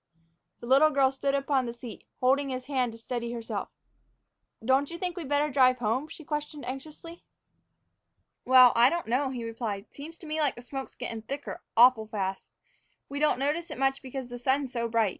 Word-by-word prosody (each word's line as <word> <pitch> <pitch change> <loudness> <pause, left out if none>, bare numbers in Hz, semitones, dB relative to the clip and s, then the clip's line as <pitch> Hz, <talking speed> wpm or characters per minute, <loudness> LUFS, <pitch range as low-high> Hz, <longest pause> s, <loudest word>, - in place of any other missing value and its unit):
The - - -7
little 275 +5 +6
girl 275 -3 +3
stood 275 +1 -1
upon 275 -2 +1
the 235 - -4
seat, 235 -1 -10 0.2
holding 270 +2 +3
his 255 -1 -4
hand 255 -3 0
to - - -10
steady 235 0 -4
herself. 230 -1 -4 1.0
"Don't 265 +3 +3
you 340 - -6
think 360 0 -3
we'd 330 -7 -6
better 290 +1 +1
drive 255 -2 +5
home?" 245 +5 -1
she 315 - -11
questioned 295 -1 -4
anxiously. 305 +6 -8 1.2
"Well, 255 -1 +8
I 235 +2 +6
don't 340 +2 -2
know," 260 +4 +1
he 250 -3 -5
replied. 225 -3 -4
"Seems 315 +4 -9
to - - -11
me 310 0 -3
like 295 -3 +1
the 240 - -11
smoke's 270 +1 -7
gettin' 230 -2 -5
thicker 275 +6 -6 0.2
awful 235 -2 +6
fast. 195 -3 -4 0.6
We 285 - -4
don't 300 -3 +3
notice 300 +6 -1
it - - -6
much 270 +1 +1
because 260 -1 -6
the 245 - -6
sun's 265 +1 0
so 235 -1 -1
bright. 225 -2 +2
265 Hz, 195 wpm, -28 LUFS, 240-285 Hz, 1.2 s, Well